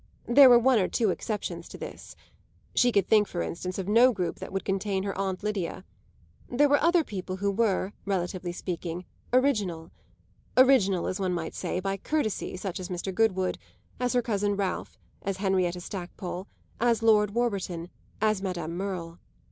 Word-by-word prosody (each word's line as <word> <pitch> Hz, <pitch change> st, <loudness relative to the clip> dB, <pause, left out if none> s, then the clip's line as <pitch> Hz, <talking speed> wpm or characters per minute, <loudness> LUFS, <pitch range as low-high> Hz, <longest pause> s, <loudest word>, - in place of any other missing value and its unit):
There 265 Hz, +2 st, +8 dB
were 240 Hz, -, +9 dB
one 245 Hz, 0 st, +4 dB
or 185 Hz, -, +2 dB
two 220 Hz, -5 st, +1 dB
exceptions 210 Hz, +3 st, -4 dB
to -, -, -9 dB
this; -, -, -9 dB, 0.6 s
she 245 Hz, 0 st, +4 dB
could 200 Hz, -4 st, +3 dB
think 210 Hz, -2 st, +4 dB
for 175 Hz, -, -3 dB
instance 180 Hz, +2 st, -4 dB
of 190 Hz, -1 st, -4 dB
no 235 Hz, +5 st, +6 dB
group 185 Hz, -6 st, -3 dB
that -, -, -8 dB
would 195 Hz, 0 st, -3 dB
contain 195 Hz, 0 st, -1 dB
her 195 Hz, -1 st, -3 dB
aunt 190 Hz, 0 st, -2 dB
Lydia. 195 Hz, -3 st, -3 dB, 0.6 s
There 285 Hz, +4 st, +4 dB
were 285 Hz, 0 st, +3 dB
other 335 Hz, +1 st, +4 dB
people 185 Hz, -6 st, -5 dB
who 200 Hz, +1 st, 0 dB
were, 200 Hz, -2 st, 0 dB
relatively 180 Hz, -2 st, -2 dB
speaking, 175 Hz, 0 st, -5 dB, 0.3 s
original 210 Hz, -11 st, +1 dB, 0.7 s
original, 235 Hz, -9 st, +5 dB
as 185 Hz, -, -2 dB
one 185 Hz, -2 st, 0 dB
might 165 Hz, -2 st, -4 dB
say, -, -, -2 dB
by 195 Hz, +1 st, -2 dB
courtesy 215 Hz, -5 st, -2 dB
such 190 Hz, 0 st, -4 dB
as 185 Hz, -, -6 dB
Mr. 185 Hz, +1 st, -4 dB
Goodwood, 190 Hz, -3 st, +1 dB, 0.4 s
as 250 Hz, 0 st, 0 dB
her 245 Hz, -1 st, +2 dB
cousin 205 Hz, -3 st, 0 dB
Ralph, 195 Hz, -2 st, -3 dB, 0.2 s
as 195 Hz, -1 st, -3 dB
Henrietta 185 Hz, -2 st, 0 dB
Stackpole, 180 Hz, 0 st, -6 dB, 0.3 s
as 230 Hz, -1 st, +2 dB
Lord 210 Hz, -2 st, +4 dB
Warburton, 190 Hz, -7 st, -2 dB, 0.3 s
as 215 Hz, -2 st, +1 dB
Madame 175 Hz, -4 st, -3 dB
Merle. 175 Hz, -3 st, -4 dB
195 Hz, 170 wpm, -28 LUFS, 185-225 Hz, 0.7 s, were